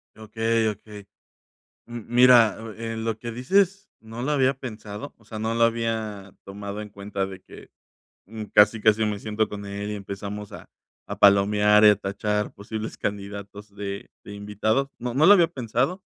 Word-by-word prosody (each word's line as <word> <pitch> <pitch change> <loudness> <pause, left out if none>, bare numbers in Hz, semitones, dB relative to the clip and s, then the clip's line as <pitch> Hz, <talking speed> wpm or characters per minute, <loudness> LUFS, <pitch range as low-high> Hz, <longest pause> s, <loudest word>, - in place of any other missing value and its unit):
Okey, 110 +1 -1
okey. 105 -1 -9 0.8
Mm, 120 0 -7
mira, 120 -3 +6
o 115 0 -8
eh, 115 +1 -5
lo 110 -1 -3
que 120 - -6
dices, 195 - +1
no 115 +2 -9
lo 140 +4 -1
había 135 -2 +3
pensado. 115 -1 -8
O 115 - -25
sea, 110 0 -7
no 110 +1 -1
lo 115 - +3
había 110 -4 -2
tomado 100 +1 -7
en 105 - -8
cuenta, 100 -1 -4
de 95 -1 -9
que - - -14 0.6
mm, 110 +2 -7
casi, 105 +2 +5
casi 110 0 +3
me 105 -1 -2
siento 110 +1 -1
con 100 -1 -7
él, 100 +1 -5
y - - -3
empezamos 100 +1 -7
a - - -11 0.4
a - - -5
palomear, 105 +1 +5
y - - +10
a 105 - +6
tachar, 105 +1 -2
posibles 110 +2 -6
candidatos 100 0 -6
de 100 -1 -6
de 105 - -9
invitado. 110 +6 -1
No 120 0 -4
no 150 +4 +4
lo 200 - +9
había 175 -5 +5
pensado. 135 - -2
110 Hz, 180 wpm, -24 LUFS, 100-115 Hz, 0.8 s, y